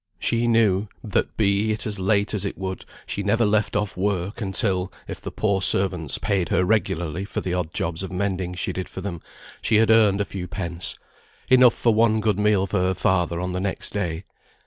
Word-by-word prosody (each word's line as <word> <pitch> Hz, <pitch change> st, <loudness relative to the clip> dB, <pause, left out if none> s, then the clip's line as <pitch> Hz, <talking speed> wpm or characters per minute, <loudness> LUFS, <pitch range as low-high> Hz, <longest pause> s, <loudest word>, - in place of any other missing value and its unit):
She 120 Hz, 0 st, 0 dB
knew, 110 Hz, -3 st, +3 dB, 0.2 s
that 105 Hz, -, -1 dB
be 105 Hz, +1 st, +2 dB
it 105 Hz, -, -2 dB
as 105 Hz, -2 st, -3 dB
late 100 Hz, +2 st, +1 dB
as 105 Hz, -3 st, -1 dB
it 100 Hz, -, -4 dB
would, 95 Hz, -1 st, -5 dB, 0.2 s
she 100 Hz, -, -3 dB
never 110 Hz, +3 st, +2 dB
left 105 Hz, +1 st, +1 dB
off 105 Hz, -1 st, -1 dB
work 100 Hz, +3 st, -2 dB
until 95 Hz, -2 st, 0 dB, 0.2 s
(if -, -, -7 dB
the -, -, -5 dB
poor 100 Hz, -3 st, 0 dB
servants 90 Hz, -6 st, +2 dB
paid 95 Hz, -6 st, -1 dB
her 90 Hz, -, +2 dB
pretty -, -, -4 dB
regularly 90 Hz, -5 st, 0 dB
for 100 Hz, -, -4 dB
the 90 Hz, -, -3 dB
odd 90 Hz, -3 st, -2 dB
jobs 85 Hz, 0 st, -2 dB
of 95 Hz, -, -5 dB
mending 95 Hz, -1 st, -2 dB
she 90 Hz, -, -2 dB
did 95 Hz, -, -5 dB
for 95 Hz, -, -7 dB
them) 90 Hz, -4 st, -5 dB, 0.4 s
she 110 Hz, -, +1 dB
had 110 Hz, 0 st, +5 dB
earned 105 Hz, -3 st, +5 dB
a 100 Hz, -, +1 dB
few 90 Hz, -3 st, -6 dB
pence, 85 Hz, -2 st, -2 dB, 0.5 s
enough 125 Hz, -2 st, +6 dB
for 115 Hz, -, +2 dB
one 110 Hz, 0 st, +3 dB
good 105 Hz, -2 st, 0 dB
meal 105 Hz, -2 st, +3 dB
for 100 Hz, +1 st, -1 dB
her 95 Hz, +1 st, +1 dB
father 90 Hz, -2 st, +1 dB
on 90 Hz, +1 st, -3 dB
the 90 Hz, +1 st, -3 dB
next 95 Hz, -1 st, -3 dB
day. 90 Hz, -4 st, -3 dB
100 Hz, 215 wpm, -23 LUFS, 90-105 Hz, 0.5 s, enough